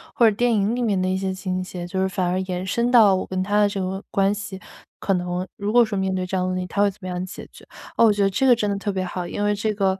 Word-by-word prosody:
或 230 -2 +6
者 - - -2
电 240 +2 +2
影 210 +1 +1
里 245 - -2
面 210 -5 +1
的 185 - 0
一 185 - 0
些 190 0 -2
情 185 -1 -3
节， 180 -1 -6
就 190 +2 -2
是 190 - +2
反 185 -1 -2
而 180 +1 0
延 185 -1 -4
伸 235 +5 0
到 225 -5 +6
我 185 - -3
跟 185 0 -2
他 205 +2 +1
的 205 - +5
这 200 -1 -4
个 190 +2 -4
关 195 0 +2
系。 205 -2 -6 0.4
可 195 - +1
能 180 0 -2
如 205 +1 -3
果 240 +1 +6
说 215 -2 -4
面 190 0 0
对 185 -1 -1
这 185 - -4
样 185 -1 0
的 185 - -1
问 - - -2
题， 180 - -3
他 200 - -1
会 205 - +4
怎 195 - -21
么 185 - -6
样 180 0 -3
解 185 - -9
决？ - - -15 0.3
哦， 230 - +6
我 220 - +6
觉 205 0 -1
得 195 - +4
这 260 +8 0
个 255 - +7
真 210 -3 -1
的 200 - -1
特 205 +1 -2
别 190 -1 -2
好， 180 0 -4
因 205 - -5
为 205 0 +2
这 215 +1 -1
个， 195 -2 +1
195 Hz, 360 characters per minute, -23 LUFS, 185-205 Hz, 0.4 s, 个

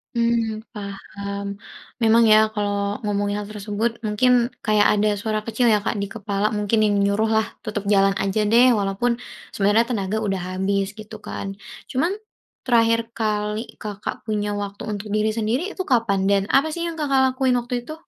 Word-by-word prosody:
Mmm, 230 -2 +1
paham. 200 0 -6 0.4
Memang 230 +1 +5
ya 215 - +8 0.2
kalau 205 -1 -2
ngomongin 205 -1 -1
hal 205 - -8
tersebut 210 +2 -2 0.2
mungkin 215 +4 +2 0.3
kayak 215 -1 +4
ada 210 0 +2
suara 215 +1 -2
kecil 230 +3 -1
ya, 210 - +2
Kak, 205 - -2
di - - -1
kepala 205 0 -2
mungkin 215 +1 +2
yang 205 - +2
nyuruh 200 +2 +1
lah 220 - +2 0.2
tetap 210 -2 -3
jalan 195 0 +4
aja 210 +2 0
deh 235 +4 +5
walaupun 200 +4 0 0.4
sebenarnya 210 +4 +2
tenaga 210 -3 -1
udah 195 -4 -1
habis 195 +1 -1
gitu 215 0 -10
kan, 195 -2 -6 0.3
cuman 315 +8 0 0.5
terakhir 230 -2 +3
kali 210 -1 -1 0.2
Kakak 205 -2 -4
punya 210 -1 -1
waktu 200 0 -6
untuk 205 +1 -5
diri 215 +1 +1
sendiri 235 - -1
itu - - -4
kapan 230 - +1
dan 200 -1 +3
apa 280 +4 +4
sih 340 +2 -3
yang 335 - -3
Kakak 275 -4 +1
lakuin 255 -1 +2
waktu 245 0 -3
itu? 275 +6 -8
215 Hz, 170 wpm, -22 LUFS, 200-230 Hz, 0.5 s, ya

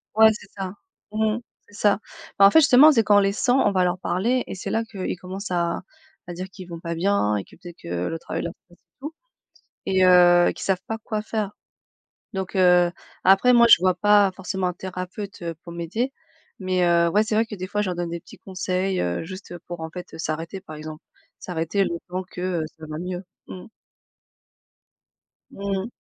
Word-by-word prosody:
ouais 220 0 +8
c'est 205 -1 -11
ça, 190 -1 -4 0.4
mmh, 220 +1 +1 0.3
c'est 205 - -16
ça. 205 -2 +2 0.4
Bah, 195 - +9
en 200 - +7
fait, 320 - +7
justement, 305 0 +7
c'est 235 -6 +4
quand 205 0 +4
on - - +7
les 195 0 +2
sent, 245 +4 +1
on 235 -6 +3
va 185 -2 +2
leur 180 0 0
parler 230 +8 0
et - - -5
c'est 185 - -6
là, 225 - +1
qu'ils 195 -4 -5
commencent 190 +3 -7
à 170 0 0 0.5
à 175 - -6
dire 185 +2 -6
qu'ils 185 -2 -11
vont 170 -1 -7
pas 170 -1 -4
bien 170 - +1
et 100 - -3
que - - -18
peut-être 175 -1 -12
que 90 +1 -3
le 165 - -4
travail - - -4
leur 170 - -4
stress 175 0 -23
et - - -46 0.2
tout 300 +3 -6 0.7
et 190 -1 +3
heu, 175 -1 +6
qu'ils - - -7
savent 190 -2 +1
pas 225 0 -3
quoi 215 -1 -3
faire. 215 -2 -3 0.8
Donc 190 -1 -4
heu, 180 -1 +5 0.3
après 195 +7 +6
moi 235 0 +7
je - - +11
vois 185 0 +3
pas 205 +1 +4
forcément 190 0 -3
un - - -2
thérapeute, 185 +2 -7
heu, 165 -1 -4
pour 170 - -9
m'aider, 190 +11 -3 0.5
mais, 185 -2 0
heu 170 0 +4
ouais 210 +4 +3
c'est 220 0 -2
vrai 225 +1 +3
que 215 - -7
des 185 -1 -5
fois 210 +1 -1
je 195 - -2
leur 175 - -4
donne 175 -1 -3
des 170 0 -5
petits 215 - -15
conseils, 185 0 -2
heu, 90 - -2
juste, 185 +2 -9
heu, 175 - -7
pour 175 -1 -6
en 160 0 -5
fait, 180 +1 -8
heu, - - -9
s'arrêter, 165 +4 -4
par 155 -5 -10
exemple. 155 0 -9 0.4
S'arrêter 175 +3 -1
le - - -2 0.2
temps 185 +1 -3
que, 180 - -8 0.2
heu, - - -2
ça 160 - -9
va 155 0 -5
mieux 180 +1 -4 0.3
mmh. 185 - -9 1.8
Mmh 200 0 -5
mh. - - -6
185 Hz, 220 wpm, -23 LUFS, 175-205 Hz, 1.8 s, je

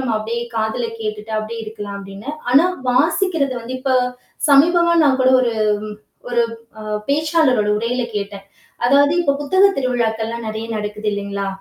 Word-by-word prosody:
நாம 255 -3 -1
அப்படியே 230 +2 -3
காதில 220 +2 -1
கேட்டுட்டு 215 0 -5
அப்படியே 225 +2 -5
இருக்கலாம் 205 -2 -7
அப்படின்னு. 195 +5 -10 0.2
ஆனா 280 +7 +6 0.3
வாசிக்கிறது 300 +1 +1
வந்து 235 +3 -7
இப்ப 265 -1 0 0.6
சமீபமா 340 +4 +5
நான் 275 -2 +4
கூட 260 - +5
ஒரு 235 -2 +1 0.8
ஒரு 240 -1 +2 0.4
ம், 215 0 -3
பேச்சாளருட 290 -7 +2
உரையில 240 +3 -1
கேட்டேன். 200 -1 -4 0.4
அதாவது 285 +4 +5
இப்போது 280 -4 +1
புத்தக 375 +7 +3
திருவிழாக்கள் 235 -4 0
எல்லாம் 230 0 -5
நறைய 220 +1 -4
நடக்குது 210 0 -4
இல்லைங்களா, 200 -1 -3
235 Hz, 145 wpm, -19 LUFS, 215-280 Hz, 0.8 s, ஆனா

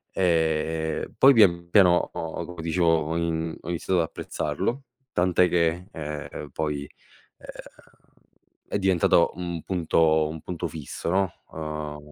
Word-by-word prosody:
Ehm, 80 -2 0
poi 135 +3 +7
pian 85 -7 +4
piano 90 -2 +4
ho, 80 +1 -5
come 90 -1 -8
dicevo, 85 +1 0
ho 80 +2 -3
in 80 -1 -2
ho - - -8
iniziato 90 +1 0
ad - - +1
apprezzarlo, 130 - -3 0.3
tant'è 90 0 +3
che, 85 +1 +1
ehm, 75 -1 -6
poi, 75 -2 -2 0.5
ehm, - - -15 1.2
è 100 - -1
diventato 90 -3 +3
un 85 -2 -4
punto 80 -3 +2
un 80 0 -7
punto 85 +1 -4
fisso, 80 +1 -6
no 95 +1 +1 0.2
uhm, 75 -1 -5
85 Hz, 135 wpm, -25 LUFS, 80-90 Hz, 1.2 s, poi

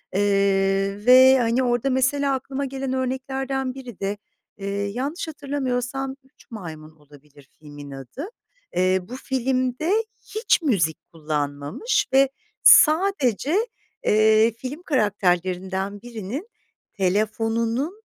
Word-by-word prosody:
eee, 195 0 +1
ve, 260 +1 +8
hani, 240 +2 +1
orada, 245 +1 +1
mesela, 270 +2 +1
aklıma 270 +1 -4
gelen 270 0 -4
örneklerden 265 0 -2
biri 250 -6 -10
de, 200 +1 -2 0.4
eee, 195 -1 -6
yanlış 235 - -3
hatırlamıyorsam 270 -3 -3
"Üç 265 - -25
Maymun" 160 -8 -8
olabilir 145 -1 -19
filmin 145 -2 -11
adı. 135 - -7 0.5
Eee, 185 +1 +3
bu 235 +8 -9
filmde 260 +3 -1 0.4
hiç 435 -5 +2
müzik 175 - +1 0.2
kullanmamış 150 - -2
ve 270 0 +5 0.3
sadece, 310 - +5 0.5
eee, 215 +1 +4
film 265 +8 -7
karakterlerinden 190 - 0
birinin 240 - -6 0.4
telefonunun 225 - -1
235 Hz, 100 wpm, -23 LUFS, 195-265 Hz, 0.5 s, ve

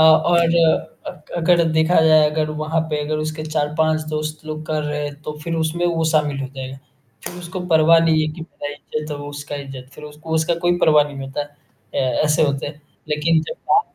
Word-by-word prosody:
और 160 +2 +6 0.7
अ, - - -2
क 150 - -17
अगर 170 0 +4
देखा 160 +2 +4
जाए 155 -1 +6
अगर 155 0 -1
वहाँ 155 +1 0
पे 150 -1 -1
अगर 155 +1 -2
उसके 155 +1 -3
4-5 155 +1 0
दोस्त 155 0 -4
लोग 155 0 -5
कर 155 -1 -1
रहे 150 0 -3
हैं 145 0 -5
तो 150 - -5
फिर 165 -1 -2
उसमें 160 +2 -1
वो 165 -2 0
शामिल 150 -3 +1
हो 135 - -3
जाएगा। 130 0 -6 0.5
फिर 175 - -6
उसको 180 +1 -6
परवाह 165 -1 +5
नहीं 160 -1 +3
है 155 - 0
कि 170 - -10
जो 165 - -7 0.2
मेरा 145 - -2
इज़्ज़त 150 +1 -6
है 150 - -3
वो 145 0 -7
उसका 145 0 -6
इज़्ज़त। 135 -2 -8
फिर 150 - -11
उसको 155 +2 -6
उसका 160 +1 +2
कोई 175 0 +3
परवाह 150 -4 +5
नहीं 145 -1 -8
होता। 135 +2 -3
अ, 145 0 -13 0.7
ऐसे 150 +1 +3
होते 140 -2 0
हैं 145 +1 -8 0.3
लेकिन 155 +2 +2
जब - - -4 0.2
बा 410 - +6
155 Hz, 220 wpm, -20 LUFS, 150-160 Hz, 0.7 s, और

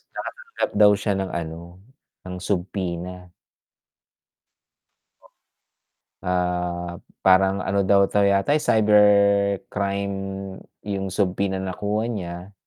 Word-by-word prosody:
nakatanggap - - -5
daw 105 -1 +7
siya 100 +1 -1
ng 95 -1 -3
ano, 85 +2 -6 0.5
ng 90 - -5
subpoena. 90 -2 -4 2.9
Ah, 90 -1 -2 0.3
parang 95 +1 +5
ano 100 +1 0
daw 100 0 +5
'to 105 - +1
yata 100 +7 +3
eh, 150 - +2
cybercrime 100 -2 +2 0.7
yung 100 -2 -3
subpoena 95 0 -1
na 95 0 -3
nakuha 105 +3 -2
niya, 90 -2 -6
95 Hz, 95 wpm, -23 LUFS, 90-100 Hz, 2.9 s, daw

